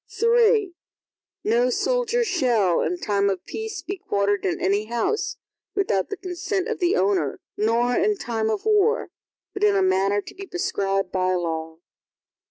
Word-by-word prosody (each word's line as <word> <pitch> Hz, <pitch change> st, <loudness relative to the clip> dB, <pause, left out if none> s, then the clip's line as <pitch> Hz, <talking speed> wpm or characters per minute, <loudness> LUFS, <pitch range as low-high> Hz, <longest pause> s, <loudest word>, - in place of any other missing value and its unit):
III 460 Hz, -4 st, +4 dB, 0.7 s
No 235 Hz, +3 st, +2 dB
soldier 485 Hz, -, +1 dB
shall, 245 Hz, -, +2 dB
in 360 Hz, -, -1 dB
time 200 Hz, -9 st, +1 dB
of 190 Hz, -2 st, -3 dB
peace 440 Hz, -4 st, -5 dB
be 390 Hz, +2 st, -4 dB
quartered 200 Hz, -, 0 dB
in 180 Hz, -, -1 dB
any 200 Hz, +3 st, +1 dB
house, 240 Hz, -, -1 dB, 0.4 s
without 370 Hz, -, 0 dB
the 410 Hz, -, -4 dB
consent 370 Hz, +2 st, -3 dB
of 455 Hz, -, -3 dB
the 350 Hz, -2 st, +2 dB
owner, 185 Hz, -7 st, +1 dB, 0.2 s
nor 230 Hz, +3 st, +1 dB
in 415 Hz, +3 st, +2 dB
time 225 Hz, -7 st, -2 dB
of 215 Hz, -, -2 dB
war, 435 Hz, +2 st, +2 dB, 0.4 s
but -, -, -4 dB
in 205 Hz, -1 st, +4 dB
a 195 Hz, -, +3 dB
manner 190 Hz, +2 st, +2 dB
to -, -, -9 dB
be 390 Hz, +1 st, -9 dB
prescribed 195 Hz, -, -1 dB
by 185 Hz, 0 st, +1 dB
law. 160 Hz, -2 st, -3 dB
235 Hz, 160 wpm, -24 LUFS, -, 0.7 s, III